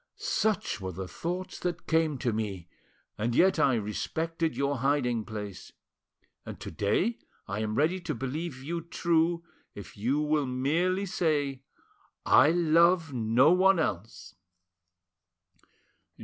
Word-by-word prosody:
Such 215 - -1
were 95 -1 -4
the 95 +2 -6
thoughts 180 - -5
that 175 -1 -3
came 160 -3 +1
to 120 -2 -1
me, 100 -5 -4 0.5
and 115 +2 -1
yet 190 +5 +4
I 135 -3 +4
respected 160 +10 -2
your 140 0 0
hiding 125 -4 0
place; 105 -4 -7 0.7
and - - -9
to - - -7
day 105 - 0 0.3
I 100 +2 -3
am 110 0 -2
ready 165 +8 +1
to 175 - -4
believe 135 +3 -5
you 170 +4 -3
true, 170 0 0 0.3
if 100 - -10
you 125 +8 0
will 150 -2 +1
merely 165 +10 0
say, 145 -7 -1 0.6
'I 150 - +6
love 170 -1 +3
no 120 +5 +4
one 190 +1 +5
else! 95 - -3
145 Hz, 130 wpm, -28 LUFS, 110-170 Hz, 0.7 s, I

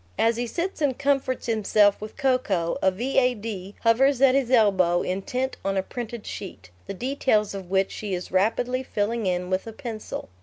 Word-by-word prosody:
As 230 +1 +3
he 240 0 -2
sits 345 +6 -3
and 275 -4 +1
comforts 275 -2 0
himself 210 -3 +3
with 215 - -8
cocoa, 215 -11 +1
a 190 - +4
"V.A.D." 225 -3 -1
hovers 255 +4 +3
at 270 -1 +6
his 270 -3 +1
elbow, 190 -8 +3
intent 250 +8 -2
on 195 0 -1
a 190 - +1
printed 235 0 -6
sheet, 95 - -8 0.2
the - - -5
details 240 -3 0
of 190 -3 -7
which 190 0 +1
she 205 -3 -4
is 180 - -7
rapidly 235 +7 +1
filling 220 -3 -2
in 180 0 -1
with 185 +4 -1
a 225 - -6
pencil. 225 - -6
220 Hz, 180 wpm, -25 LUFS, 190-255 Hz, 0.2 s, at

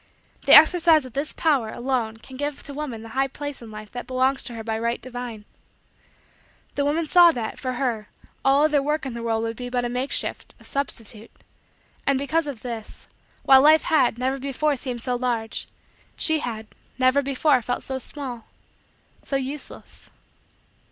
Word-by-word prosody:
The - - +10
exercise 325 -3 +7
of 255 - -11
this 285 +2 -2
power 280 -9 +1
alone 240 -2 -2
can 260 +3 -13
give 290 +1 -4
to 280 - -7
woman 270 -6 -5
the 225 - -10
high 270 +4 0
place 290 0 -7
in 230 - -10
Life 215 -1 -10
that 245 - -7
belongs 260 +1 +1
to 240 - -8
her 225 - -6
by 220 0 -2
right 235 +1 -1
divine. 245 -4 -6 1.3
The 285 - 0
woman 305 +3 +1
saw 350 +2 +7
that, 230 -5 -4
for 255 -1 -3
her, 240 -5 -2 0.3
all 275 +2 +4
other 300 -2 +3
work 300 +1 -1
in 265 - -4
the 235 - -6
world 225 -1 -1
would 225 0 -3
be 245 +2 -6
but 245 -1 -1
a - - -2
makeshift 250 +3 -2
a - - -17
substitute; 230 -5 -4 0.8
and, 275 -1 +3
because 295 +4 0
of 265 -6 -6
this, 230 -3 -7 0.4
while 265 -1 +7
Life 310 +2 +6
had, 270 -8 +2
never 260 +2 -1
before 280 +2 0
seemed 245 -2 -4
so 250 -1 0
large, 240 -3 -2 0.5
she 315 -1 +1
had, 225 -5 -5 0.3
never 255 +2 +4
before 275 0 +2
felt 245 +2 -3
so 265 -1 -2
small 250 -4 -6 0.7
so 275 - -4
useless. 270 +2 -6
260 Hz, 180 wpm, -24 LUFS, 235-285 Hz, 1.3 s, The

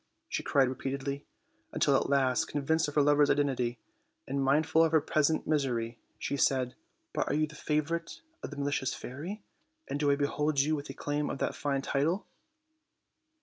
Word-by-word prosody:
she - - -2
cried 135 -2 +3
repeatedly, 140 +2 -4 0.4
until - - +3
at - - +1
last, 135 -3 +2
convinced 160 +3 +1
of 145 - -6
her 145 - +5
lover's 145 0 +4
identity, 125 -4 +1 0.5
and 135 +1 -1
mindful 155 +4 +4
of 165 - +2
her 160 - +5
present 155 +1 +1
misery, 125 -6 0 0.2
she - - -2
said: 130 -2 +2 0.4
"But - - 0
are - - 0
you 155 +1 +3
the 155 - -13
fa 150 0 0
vorite 170 - -4 0.2
of - - -5
the 145 - -9
malicious 140 -2 -1
fairy? 170 - -7 0.4
And 145 - -3
do 145 -1 +2
I 140 - +5
behold 145 +1 0
you 150 +3 +3
with 145 -2 -6
a 135 - -6
claim 145 0 -2
to - - -2
that - - -1
fine 140 -2 -1
title?" 155 +10 0
145 Hz, 185 wpm, -30 LUFS, 135-155 Hz, 0.5 s, her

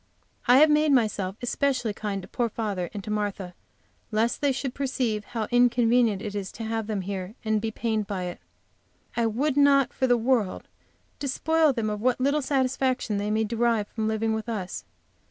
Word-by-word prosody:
I 245 +1 +7
have 305 +2 +7
made 300 0 +3
myself 210 -7 +1
especially 250 -3 0
kind 200 -2 -4
to - - -10
poor 240 -1 -1
father 205 -6 -3
and 205 -2 -6
to 215 - -5
Martha 205 -3 -3 0.6
lest 225 +2 0
they 285 -1 +3
should 265 -1 -3
perceive 250 -6 -1
how 230 -3 -3
inconvenient 240 -3 +3
it 210 - -4
is 200 -2 -4
to 225 - -7
have 225 -1 -2
them 210 -3 -2
here, 190 +2 -5
and 215 -1 +1
be 225 - -1
pained 220 -2 -2
by 195 -3 -3
it. 180 -1 -5 0.8
I 235 -1 +2
would 265 +6 0
not 280 -2 +4
for 260 - 0
the 245 -1 +4
world 230 -5 0 0.5
despoil 315 +3 +2
them 230 -4 -2
of 210 0 -4
what 250 +1 +1
little 280 +3 +2
satisfaction 260 -4 0
they 205 +1 -2
may 215 +1 +1
derive 225 -1 0
from 220 -1 -2
living 220 0 0
with 220 +1 -4
us. 195 -5 -4
225 Hz, 190 wpm, -26 LUFS, 210-255 Hz, 0.8 s, I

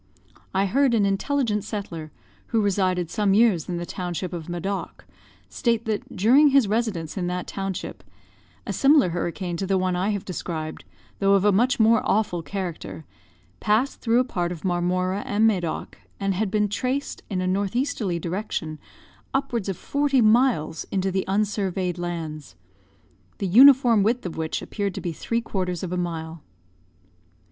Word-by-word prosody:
I 195 +1 +1
heard 260 +4 +2
an 210 -3 +3
intelligent 210 +1 0
settler, 190 -8 -6 0.4
who 230 - +1
resided 185 -4 0
some 205 -3 +2
years 205 -8 +3
in 175 - -2
the 175 - -4
township 180 0 -4
of 170 -1 -6
Madoc, 190 +3 -4 0.4
state 230 -2 0
that, 215 -2 -3
during 255 +10 +6
his 275 -5 +4
residence 200 -8 -2
in 180 -2 -1
that 180 0 -3
township, 195 -1 -5 0.6
a - - -3
similar 275 - +5
hurricane 175 +1 -3
to 195 - -3
the 195 0 +2
one 185 -1 0
I 185 +3 0
have 200 -2 -2
described, 160 -4 -5 0.3
though 195 0 +4
of 195 0 +2
a 205 - +6
much 240 +6 +2
more 225 0 +5
awful 205 -5 0
character, 170 -2 -6 0.5
passed 225 +6 +1
through 230 0 +2
a - - +4
part 175 -8 -2
of 175 0 -7
Marmora 185 +2 0
and 210 +2 +1
Madoc, 180 -7 -1 0.2
and 195 -1 0
had 200 +2 -1
been 210 +1 +1
traced, 255 +7 -2
in 190 -3 -2
a 185 - -1
north 195 +3 -1
easterly 245 -9 -1
direction, 170 -3 -4 0.6
upwards 240 -7 -1
of 190 - -3
forty 285 -2 +1
miles 225 - +3
into 190 0 0
the 190 0 -1
unsurveyed 195 -3 -1
lands; 160 - -5 0.8
the - - -3
uniform 245 +2 +7
width 230 +3 +1
of 175 - -4
which 160 -1 -3
appeared 200 -3 -3
to - - -4
be 175 - -3
three 230 +8 -2
quarters 185 -5 -3
of 180 - -4
a - - -1
mile. 165 -2 -4
195 Hz, 165 wpm, -24 LUFS, 175-220 Hz, 0.8 s, uniform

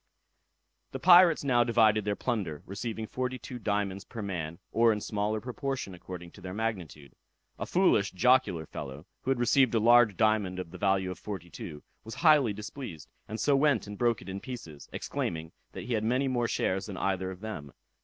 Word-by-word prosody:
The - - -4
pirates 175 -3 +7
now 125 -3 +4
divided 110 -3 +3
their 105 -1 0
plunder, 100 - -3
receiving 110 +3 -4
forty 130 +3 -3
two 125 +1 -8
diamonds 100 -3 -1
per 115 -3 -7
man, 85 -5 -4
or 115 0 +4
in 105 - -1
smaller 105 +1 -1
proportion 125 -2 -4
according 85 -1 -9
to 100 - -15
their 90 +1 -6
magnitude. 90 - -4 0.5
A - - -3
foolish 175 - +3
jocular 100 -6 +3
fellow, 70 +1 -8 0.2
who - - -4
had 135 - +2
received 125 0 +3
a - - +4
large 115 -2 +5
diamond 110 -4 +2
of 90 -3 -6
the 95 - -10
value 95 -2 +1
of 90 - -8
forty 95 -5 -7
two, 75 0 -8 0.2
was 110 0 -8
highly 150 -8 +5
displeased, 105 - -8 0.2
and 110 +2 -5
so 145 - +3
went 140 -4 +3
and 105 0 -7
broke 120 0 +1
it - - -15
in 95 +1 -4
pieces, 100 - -9
exclaiming, 80 0 -4 0.2
that - - -6
he 125 - -3
had 110 -1 0
many 125 +5 +1
more 120 -2 0
shares 95 -2 -1
than 100 -3 -6
either 95 -1 -1
of 95 0 -9
them. 90 -11 -6
105 Hz, 195 wpm, -29 LUFS, 95-120 Hz, 0.5 s, pirates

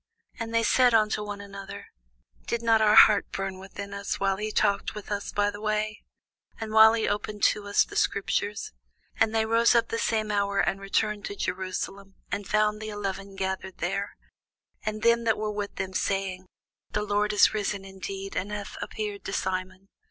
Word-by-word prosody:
And 230 0 -4
they 230 0 +2
said 250 0 +4
one 215 -1 +4
to 210 -1 -3
another, 200 0 -8 0.6
Did 235 0 -2
not 225 -1 +4
our 215 0 +5
heart 210 -2 +7
burn 195 -1 -4
within 200 +1 -8
us, 200 0 -3
while 195 -1 +1
he 215 +1 -3
talked 205 -1 +1
with 210 0 -8
us 205 0 -3
by 205 0 +1
the 205 0 -9
way, 215 0 -1 0.6
and 220 -1 -5
while 220 0 +8
he 225 -1 0
opened 205 0 -3
to 205 -1 +2
us 205 - +3
the 410 - -12
scriptures? 210 - 0 0.5
And 225 - +4
they 220 0 +2
rose 230 +2 +4
up 230 0 +3
the 230 - -2
same 215 -2 0
hour, 200 -1 0
and 195 +1 +1
returned 205 +1 -1
to 200 - -5
Jerusalem, 190 +1 -4 0.2
and 200 -2 -3
found 215 0 +2
the 215 - -5
eleven 195 -1 -5
gathered 190 -1 -3
together, 200 +3 -2 0.7
and 215 0 -4
them 235 0 +4
that 225 -2 +2
were 215 0 -2
with 205 -1 -4
them, 190 0 -4
saying, 190 -1 -2 0.5
The 210 - 0
Lord 210 0 +1
is 210 - +5
risen 205 -2 -2
indeed, 195 0 -7
and 200 +3 -2
hath 205 -1 -6
appeared 210 -2 -5
to - - -4
Simon. 185 0 -3
205 Hz, 190 wpm, -27 LUFS, 195-215 Hz, 0.7 s, while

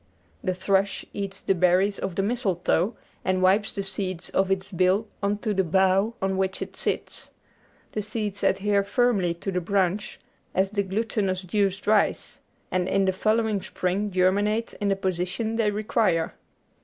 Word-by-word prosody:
The 185 -1 0
thrush 195 +1 +1
eats 200 -1 -5
the - - +2
berries 185 +3 +3
of 190 -2 -3
the 195 - +1
mistletoe, 195 -3 0 0.3
and 185 0 +1
wipes 195 +3 +3
the 200 - -3
seeds 190 -2 -4
off 190 0 +2
its 195 +1 -1
bill 185 +4 +2
on 200 +1 +1
to 215 - +1
the 190 -1 +2
bough 190 +5 +2
on 190 0 0
which 190 0 -1
it - - -6
sits. - - -4 0.6
The 215 - -2
seeds 210 -1 -4
adhere 200 0 +2
firmly 200 -5 +1
to 195 +3 -4
the 180 -1 -1
branch 195 +1 0 0.4
as 190 +1 +2
the 205 -1 +1
glutinous 195 -1 -1
juice 195 +1 0
dries, 210 +1 +1 0.3
and 185 -1 0
in 195 0 +2
the 190 - +2
following 215 +1 +1
spring 190 +4 -1
germinate 205 +4 +1
in 205 - +1
the 195 - +3
position 190 +4 -2
they 220 -2 +2
require. 205 -5 +1
195 Hz, 165 wpm, -25 LUFS, 185-210 Hz, 0.6 s, berries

